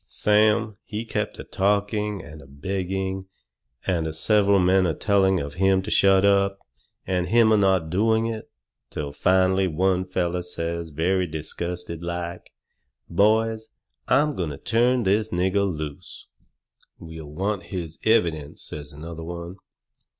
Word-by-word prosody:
Sam, 105 0 +2
he 110 +2 -5
kept - - -3
a - - -7
talking 105 0 0
and 80 0 -11
a 70 - -15
begging, 95 +5 -3 0.6
and 80 -3 -1
several 100 +2 +4
men 95 0 +3
a 80 - -1
telling 95 -3 +2
of 70 -1 -5
him 95 -1 +3
to 105 - -5
shut 95 0 +5
up. 100 0 +3 0.5
And 90 -1 -1
him 115 0 +4
not 95 -3 +3
a - - -9
doing 110 +6 +2
it. 115 -1 -5 0.4
Till 70 -1 -5
finally 95 +4 +2
one 95 +2 +1
feller 90 -1 -1
says 85 -1 -4
very 90 +5 0
disgusted 85 +2 -5
like: 85 0 -5 0.6
"Boys, 110 +4 +2 0.4
I'm 150 +1 +3
going 85 -4 -2
to 70 - -6
turn 120 - +2
this 105 +3 +1
nigger 95 +2 +1
loose." 75 -3 -7 0.7
"We'll 80 -2 -10
want 100 +5 -2
his 85 -4 -6
evidence," 85 -10 +1
says 75 -1 -8
another 80 +2 -8
one. 85 +2 -7
95 Hz, 140 wpm, -24 LUFS, 85-100 Hz, 0.7 s, shut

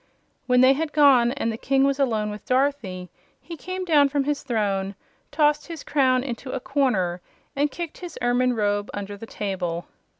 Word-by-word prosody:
When 250 -1 +4
they 260 +1 +7
had 300 +2 -3
gone 270 -5 +5
and 250 -5 -2
the 220 - -5
King 270 0 +2
was 275 0 +1
alone 220 -6 0
with 210 - -10
Dorothy 255 - -1 0.3
he 335 - -9
came 370 +3 -5
down 295 -5 +4
from 285 0 0
his 290 +1 -1
throne, 200 -5 -1 0.3
tossed 300 -1 +1
his 330 -3 -7
crown 260 -3 +2
into 255 0 -6
a 265 - -2
corner 245 -11 0 0.3
and 290 +1 +1
kicked 335 +2 -7
his 355 -3 -8
ermine 245 +1 +2
robe 205 -2 -1
under 205 0 -5
the 225 +3 -10
table. 180 -6 -3
255 Hz, 180 wpm, -24 LUFS, 210-285 Hz, 0.3 s, they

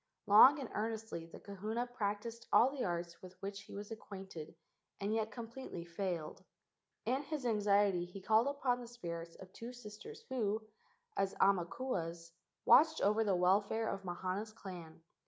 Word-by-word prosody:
Long 220 +8 +9
and 265 - -4
earnestly 220 -6 -3
the - - -11
kahuna 210 +4 -3
practised 230 -1 -3
all 255 +3 +6
the 275 -2 -3
arts 170 -1 -3
with 185 0 -12
which 200 +1 -5
he 210 - -15
was 205 +2 -7
acquainted 190 -7 -8 0.4
and 200 +2 -1
yet 220 -1 0
completely 230 -5 -7
failed. 170 -2 -4 0.6
In 260 +4 +1
his 295 -2 -4
anxiety 205 -5 +3
he 180 +3 -9
called 220 +5 +4
upon 265 -3 0
the 240 - -8
spirits 170 -8 -6
of 185 0 -13
two 235 +2 -7
sisters 245 - -10
who, 220 -4 0 0.5
as 195 - 0
aumakuas, 175 -3 0 0.3
watched 315 +2 +7
over 210 +3 +3
the 200 -3 +2
welfare 200 +5 +2
of 195 -2 -3
Mahana's 185 +4 -3
clan. 170 -6 -9
205 Hz, 155 wpm, -36 LUFS, 185-230 Hz, 0.6 s, Long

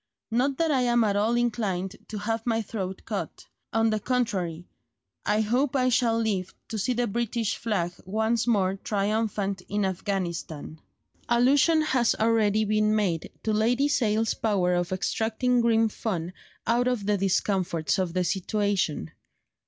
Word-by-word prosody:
Not 260 +4 +1
that 325 -1 +1
I 265 -3 +2
am 240 -1 +3
at 205 -2 +1
all 215 +4 +2
inclined 210 -6 -1
to 215 - -6
have 225 +2 -2
my 225 -1 +1
throat 190 -3 -5
cut; - - -5 0.3
on 225 0 +2
the 215 - 0
contrary, 190 -9 -1 0.6
I 210 +1 +3
hope 250 +6 +1
I 255 -1 +3
shall 235 -2 +2
live 200 -5 -1
to 220 - -3
see 250 +6 0
the 245 0 0
British 230 0 -1
flag 195 -7 -1
once 220 +4 0
more 195 -4 +2
triumphant 205 -1 -1
in 205 0 0
Afghanistan." 175 -5 -3 0.5
Allusion 280 +7 +4
has 255 -6 +2
already 220 -1 +2
been 215 0 +2
made 185 -7 0
to 220 - 0
Lady 240 +6 +2
Sale's 225 -6 +1
power 190 -5 +1
of 175 0 -1
extracting 225 +6 0
grim 225 -1 +3
fun 185 -5 -3 0.3
out 240 +2 +2
of 245 -5 -1
the 210 0 +2
discomforts 190 -3 0
of 180 -3 -1
the 185 - +2
situation. 190 - -1
215 Hz, 150 wpm, -26 LUFS, 195-235 Hz, 0.6 s, Allusion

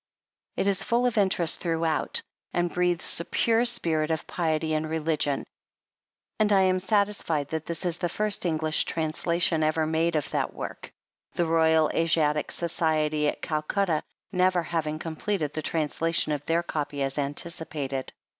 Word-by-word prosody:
It - - +1
is 195 -1 +1
full 240 +3 +2
of 245 - +1
interest 190 -5 +2
throughout, 165 -2 0 0.3
and 175 -1 0
breathes 175 -2 0
a 170 - -4
pure 230 +1 +2
spirit 160 -10 0
of 160 -1 -1
piety 160 -2 -1
and 155 0 -1
religion, 155 -3 0 1.0
and 215 -1 +3
I 195 -1 +6
am 185 -1 +3
satisfied 195 -7 0
that 160 -1 -4
this 170 +2 -3
is 175 -1 0
the 175 - 0
first 210 +3 0
English 155 -2 +1
translation 165 +1 0
ever 155 +1 +2
made 160 +1 +1
of 150 - 0
that - - -1
work, - - -7 0.4
the 175 - +1
Royal 160 -1 +4
Asiatic 155 -2 +2
Society 155 -3 0
at - - -2
Culcutta 155 +2 0 0.3
never 185 -2 +2
having 155 -2 -2
completed 160 0 -2
the 155 - -2
trans 155 -2 -2
lation 165 -2 +2
of 145 -1 -3
their 170 +1 +2
copy 145 -4 -3
as 135 +2 -2
anticipated. 145 -2 -3
160 Hz, 155 wpm, -27 LUFS, 155-175 Hz, 1.0 s, I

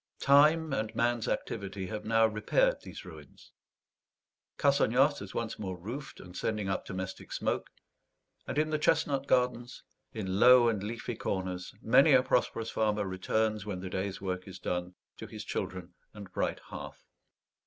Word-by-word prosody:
Time 150 +2 +5
and 110 -3 -2
man's 120 0 +1
activity 100 -2 -3
have 105 +3 -5
now 115 0 +4
repaired - - +1
these - - -10
ruins; - - -13 1.1
Cassagnas 140 0 +3
is 100 - -9
once 115 -1 -3
more 95 -3 -4
roofed 120 +10 -7
and 90 0 -12
sending 105 -1 -2
up 95 - -2
domestic 95 0 -6
smoke; - - -2 0.8
and - - -4
in 155 +1 +1
the 155 - 0
chestnut 140 -2 +1
gardens, 125 -1 0 0.3
in 95 -5 -3
low 125 0 +8
and 105 -4 -1
leafy 115 +3 -4
corners, 95 -3 -4
many 135 +6 +6
a 130 -1 +6
prosperous 115 -3 0
farmer 105 -2 0
returns, 105 +3 -1
when 100 -3 -4
the 90 0 -6
day's 95 +1 -3
work 95 -1 -4
is 95 0 -8
done, 90 0 -3 0.2
to - - -8
his - - -8
children 90 -1 -4 0.2
and 100 -3 -10
bright - - -1
hearth. - - -9
110 Hz, 155 wpm, -30 LUFS, 95-125 Hz, 1.1 s, low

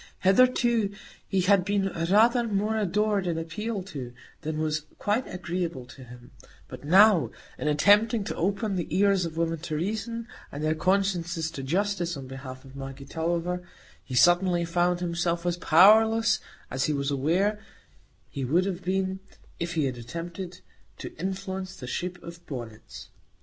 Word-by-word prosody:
Hitherto 235 +1 +4 0.4
he 190 -2 +1
had 195 0 +4
been 200 0 0
rather 220 +8 +3
more 210 +1 0
adored 210 -1 +1
and 170 -2 -1
appealed 190 +5 -4
to 125 -4 -6 0.3
than 155 -1 -3
was 155 0 -1 0.2
quite 215 +5 -1
agreeable 175 -6 -3
to 130 +1 -13
him; 125 +1 -13 0.4
but - - -10
now, 190 +3 +6 0.3
in - - -2
attempting 205 +9 +4
to 200 - -4
open 200 +2 -1
the 175 - -2
ears 195 +1 +3
of 165 -1 -6
women 165 -1 0
to 155 -1 -4
reason, 220 +7 -3 0.2
and 145 +1 -5
their 155 0 +2
consciences 175 -2 0
to 145 - -6
justice, 175 +2 -1
on 135 - -7
behalf 130 0 -9
of 135 0 -14
Maggie 135 0 -8
Tulliver, 170 +4 -2 0.4
he 130 - -6
suddenly 175 +5 +4
found 175 +1 +1
himself 170 0 -1
as 175 -1 0
powerless 220 +6 +5 0.3
as 130 0 0
he 155 - 0
was 140 0 -1
aware 180 +10 +1 0.7
he 140 - -5
would 165 +9 +2
have 190 -2 -3
been 190 +1 -1 0.4
if 170 +1 -3
he 155 -3 +2
had 125 -2 -3
attempted 170 +8 -7 0.4
to - - -8
influence 190 +1 -4
the 125 - -9
shape 180 +7 -3
of 170 0 -10
bonnets. 120 -6 -8
175 Hz, 160 wpm, -27 LUFS, 155-200 Hz, 0.7 s, now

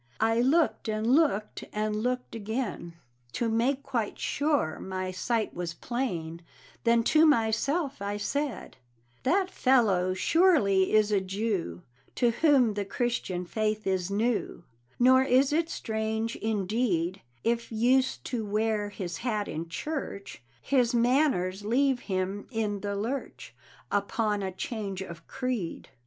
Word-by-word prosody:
I 225 +1 +2
looked 285 -2 +2
and 215 0 -1
looked, 250 -5 +2
and 210 0 -1
looked 250 +1 -2
again, 220 -5 -4 0.4
To 235 - -1
make 255 +5 +1
quite 230 -7 -2
sure 285 - 0
my 185 0 -4
sight 220 +4 -1
was 170 -1 -4
plain, 170 -9 -3 0.4
Then 230 0 +4
to 310 +6 +4
myself 275 - +1
I 200 +1 -2
said: 275 - -3 0.4
That 375 +7 +1
fellow 200 -8 +3
surely 205 - +3
is 215 -1 +4
a 200 -2 +3
Jew, 190 - -3 0.3
To 240 -1 +3
whom 260 -4 +4
the 205 0 -2
Christian 200 -4 -2
faith 215 +3 -1
is 190 -1 0
new, 215 -2 -1 0.3
Nor 260 +1 +6
is 265 +2 +3
it 330 +1 +1
strange, 220 -2 -2
indeed, 200 -4 -1 0.2
If 235 0 -1
used 255 +4 +2
to 240 -3 -2
wear 210 0 0
his 180 -4 -5
hat 215 -4 -2
in 165 +2 -5
church, 200 - -5 0.2
His 250 -3 +2
manners 235 -7 +2
leave 260 +4 +2
him 190 -1 -3
in 215 -4 -2
the 200 0 -3
lurch 235 +7 -4 0.4
Upon 205 +1 0
a 190 -1 -2
change 195 -1 -4
of 170 -2 -10
creed. 250 -10 -3
220 Hz, 135 wpm, -28 LUFS, 195-255 Hz, 0.4 s, Nor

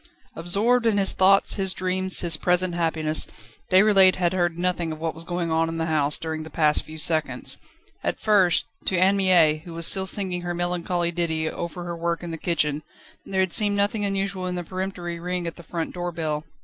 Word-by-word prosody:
Absorbed 220 +8 +1
in 215 -2 +2
his 195 -1 +2
thoughts, 195 +1 +4
his 190 -1 -1
dreams, 185 0 0
his 170 -2 0
present 180 +2 0
happiness, 160 -2 0 0.4
Déroulède 190 -1 +6
had 175 -1 0
heard 175 -2 0
nothing 175 -2 -1
of 155 - -5
what 165 0 -2
was 165 - -5
going 175 -1 -3
on 165 0 +1
in 165 - -4
the 165 - -1
house, 150 -2 0
during 160 -1 -4
the 155 - -8
past 150 -1 +2
few 155 0 -10
seconds. 155 0 +2 0.4
At - - -2
first, 195 -5 +3 0.2
to 185 - +1
Anne 190 +3 +4
Mie, 175 -6 +4
who 170 -1 -9
was 165 0 -2
still 190 +1 0
singing 185 -2 -1
her 175 0 -4
melancholy 175 0 -1
ditty 160 -2 -1
over 170 +2 -5
her 170 0 -5
work 170 +1 -2
in 170 - -5
the 165 - -6
kitchen, 150 -4 0 0.5
there 190 -1 0
had 185 -2 +1
seemed 205 -1 +4
nothing 205 +1 0
unusual 195 -2 -1
in 180 - -3
the 175 - -4
peremptory 180 -1 -5
ring 180 0 -3
at 165 - -5
the - - -11
front 165 0 -5
door 175 0 -4
bell. 155 -2 -3
175 Hz, 210 wpm, -24 LUFS, 165-185 Hz, 0.5 s, Déroulède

